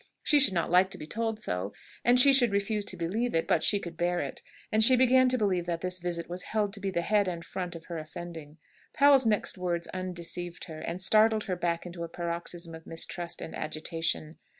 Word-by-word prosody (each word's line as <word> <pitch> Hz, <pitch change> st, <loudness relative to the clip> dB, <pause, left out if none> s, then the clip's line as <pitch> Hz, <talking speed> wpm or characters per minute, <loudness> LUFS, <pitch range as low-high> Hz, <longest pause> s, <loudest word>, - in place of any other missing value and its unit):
She 295 Hz, -, +4 dB
should 255 Hz, -9 st, +5 dB
not 170 Hz, -1 st, 0 dB
like 185 Hz, +1 st, +5 dB
to -, -, -6 dB
be -, -, -8 dB
told 225 Hz, +5 st, -3 dB
so, 90 Hz, -, -2 dB, 0.3 s
and 245 Hz, +1 st, +5 dB
she 275 Hz, +2 st, +8 dB
should 245 Hz, -5 st, +5 dB
refuse 200 Hz, +1 st, -1 dB
to -, -, -5 dB
believe 210 Hz, +8 st, -2 dB
it, 165 Hz, -, +1 dB
but 160 Hz, -, +2 dB
she 205 Hz, -, +4 dB
could 170 Hz, -3 st, -8 dB
bear 175 Hz, +1 st, 0 dB
it; -, -, -5 dB, 0.3 s
and 215 Hz, +1 st, +3 dB
she 255 Hz, +3 st, +7 dB
began 255 Hz, 0 st, +5 dB
to 255 Hz, -, 0 dB
believe 185 Hz, -6 st, 0 dB
that 170 Hz, -1 st, -2 dB
this 185 Hz, 0 st, -2 dB
visit 170 Hz, -1 st, -2 dB
was 180 Hz, +1 st, -4 dB
held 210 Hz, -1 st, -1 dB
to 210 Hz, -, -8 dB
be 195 Hz, 0 st, -2 dB
the 170 Hz, -2 st, -1 dB
head 205 Hz, 0 st, +2 dB
and 170 Hz, -2 st, -4 dB
front 180 Hz, -2 st, -5 dB
of 165 Hz, 0 st, -10 dB
her 170 Hz, -2 st, -5 dB
offending. 160 Hz, -1 st, -9 dB, 0.4 s
Powell's 280 Hz, -3 st, +5 dB
next 210 Hz, -3 st, 0 dB
words 175 Hz, -1 st, -1 dB
undeceived 175 Hz, -1 st, -4 dB
her, 160 Hz, -2 st, -8 dB
and 175 Hz, +4 st, -4 dB
startled 215 Hz, +2 st, +4 dB
her 185 Hz, -4 st, -2 dB
back 170 Hz, -1 st, -2 dB
into 170 Hz, -1 st, -7 dB
a 170 Hz, -, -6 dB
paroxysm 170 Hz, 0 st, -5 dB
of 160 Hz, 0 st, -11 dB
mistrust 170 Hz, +1 st, -5 dB
and -, -, -7 dB
agitation. 155 Hz, 0 st, -3 dB
180 Hz, 225 wpm, -29 LUFS, 170-215 Hz, 0.4 s, she